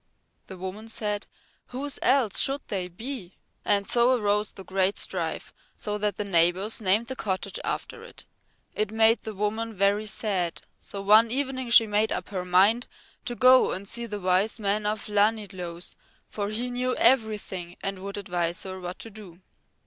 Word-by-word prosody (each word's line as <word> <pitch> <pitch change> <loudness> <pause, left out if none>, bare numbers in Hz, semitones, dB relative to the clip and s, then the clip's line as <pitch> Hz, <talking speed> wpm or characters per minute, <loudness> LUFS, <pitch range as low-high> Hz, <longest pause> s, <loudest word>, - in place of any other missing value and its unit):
The 190 - -9
woman 190 +4 -7
said: 210 -2 -3 0.4
"Whose 275 +3 -4
else 255 -6 +3
should 275 +1 +2
they 185 -3 -2
be?" 195 0 -7 0.3
And 200 -1 +1
so 245 +1 +4
arose 210 0 +1
the 190 - -11
great 190 +1 0
strife 170 -4 -3 0.2
so 210 -1 -3
that 210 0 -1
the 210 - -2
neighbours 185 +4 +2
named 210 +3 +3
the 260 +2 -5
cottage 190 -6 -3
after - - -4
it. - - -12 0.5
It 215 -1 -1
made 225 +1 +4
the 220 -1 -7
woman 220 +2 -2
very 200 +2 +2
sad, 195 -5 -1 0.2
so 200 -1 -6
one 215 +3 +6
evening 260 0 -2
she 235 -1 +7
made 210 +1 +1
up - - -3
her 190 -3 -3
mind 195 +7 +4 0.4
to 240 - -3
go 255 +1 +6
and 195 +2 -6
see 235 +3 -3
the 210 -2 -5
Wise 185 +4 +1
Man 210 0 0
of 210 0 -2
Llanidloes, 205 -5 -1 0.3
for 205 -1 -3
he 240 +4 -2
knew 250 +1 -1
everything 210 -7 +1
and 195 -1 -3
would 200 +1 -6
advise 175 -3 -2
her 190 -1 -6
what 180 0 -6
to 225 - -8
do. 195 -4 -12
210 Hz, 170 wpm, -26 LUFS, 190-225 Hz, 0.5 s, she